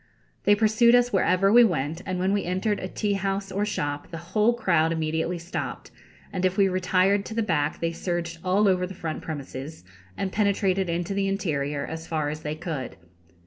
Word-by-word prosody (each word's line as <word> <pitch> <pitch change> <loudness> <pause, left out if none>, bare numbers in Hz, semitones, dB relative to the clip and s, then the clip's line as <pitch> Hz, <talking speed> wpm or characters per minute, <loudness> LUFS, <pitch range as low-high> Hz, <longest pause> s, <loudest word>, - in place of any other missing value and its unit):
They 205 - +6
pursued 225 +3 +4
us 245 -1 +3
wherever 195 +1 +3
we 240 +1 +9
went, 165 - 0
and 185 -1 -2
when 190 +2 +1
we 205 - +1
entered 190 +4 -1
a 185 - -4
tea 205 +2 -1
house 195 0 -2
or 200 +2 -1
shop 145 -7 -3
the 165 - -6 0.2
whole 220 +2 +4
crowd 165 -8 +2
immediately 160 +2 -1
stopped, 170 +2 -5 0.4
and 185 -1 -2
if 185 0 +1
we 200 -1 +5
retired 185 +2 +2
to 220 - -7
the 230 - +1
back 150 -7 0
they 165 0 0
surged 170 -1 -3
all 195 +3 +3
over 180 -1 +2
the 190 - -9
front 160 -3 -4
premises, 140 - -7 0.3
and 190 - -2
penetrated 195 -3 +1
into 175 +3 -2
the 195 0 0
interior 150 -7 -1
as 160 0 -7
far 155 -2 -1
as 155 +1 -4
they 150 0 -3
could. 155 - -5
185 Hz, 195 wpm, -26 LUFS, 160-200 Hz, 0.4 s, we